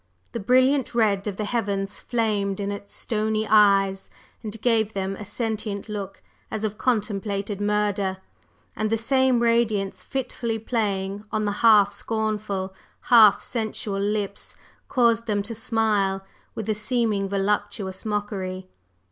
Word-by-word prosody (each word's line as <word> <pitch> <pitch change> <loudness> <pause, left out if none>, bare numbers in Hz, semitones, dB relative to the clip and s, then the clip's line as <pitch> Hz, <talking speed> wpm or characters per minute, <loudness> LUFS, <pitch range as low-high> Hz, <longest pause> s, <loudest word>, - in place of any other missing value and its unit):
The 235 - -4
brilliant 255 +4 +3
red 210 -3 +2
of 200 -2 -3
the 215 - -2
heavens 200 -3 -2
flamed 210 -5 -1
in 200 0 -2
its 200 0 -7
stony 215 -1 -1
eyes, 195 -2 +4 0.3
and 220 -1 -6
gave 220 -2 +2
them 195 0 -2
a 210 - -8
sentient 215 -1 -3
look 200 -2 -6 0.3
as 220 0 -4
of 215 -1 -3
contemplated 205 -3 -1
murder, 205 -2 0 0.6
and 215 0 -1
the 225 - +2
same 260 +1 +2
radiance 225 -4 +1
fitfully 245 -4 -3
playing 205 -3 -2
on 215 0 0
the 205 - 0
half 210 -3 +6
scornful, 210 -3 -2 0.4
half 215 -4 +8
sensual 215 -3 -3
lips 205 -1 -3 0.3
caused 230 -2 +2
them 205 -2 0
to 225 +3 -6
smile 215 -4 0 0.3
with 220 - -5
a 215 - +2
seeming 215 -2 0
voluptuous 200 -1 -1
mockery. 200 -3 -3
210 Hz, 135 wpm, -24 LUFS, 200-225 Hz, 0.6 s, half